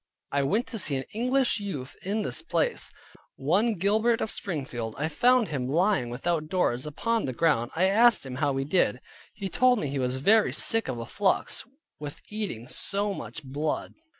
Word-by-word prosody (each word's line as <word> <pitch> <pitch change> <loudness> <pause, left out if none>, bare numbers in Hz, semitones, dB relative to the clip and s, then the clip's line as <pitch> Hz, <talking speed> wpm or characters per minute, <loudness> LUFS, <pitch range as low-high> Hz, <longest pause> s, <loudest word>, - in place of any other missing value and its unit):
I 140 - +2
went 205 - +1
to 225 - -4
see 145 - +1
an 130 - -2
English 250 +1 +2
youth 145 -10 -5
in 210 +3 -1
this - - -2
place, 480 +8 0 0.4
one 190 - +2
John - - -8
Gilbert 220 +5 +2
of 220 - -2
Springfield. 130 - -3
I 150 - 0
found 240 +7 +3
him 135 -5 -2
lying 175 - +2
without 155 +5 -1
doors, 155 -7 0
upon 230 +9 -1
the 130 - -3
ground. 120 -4 +2
I 170 - +2
asked 225 +1 +5
him 130 -1 -6
how 140 0 +1
he 135 - -1
did? 140 - +2 0.4
He 200 - -4
told 250 +7 +3
me 150 -9 -2
he 140 0 -2
was 125 0 0
very 210 +11 +4
sick 225 -1 +1
of 130 - -3
a 115 - -5
flux, 200 - 0 0.3
with 150 +1 -7
eating 200 - -4
so 200 +8 -1
much 120 - -7
blood. 145 +3 -3
170 Hz, 190 wpm, -27 LUFS, 135-215 Hz, 0.4 s, asked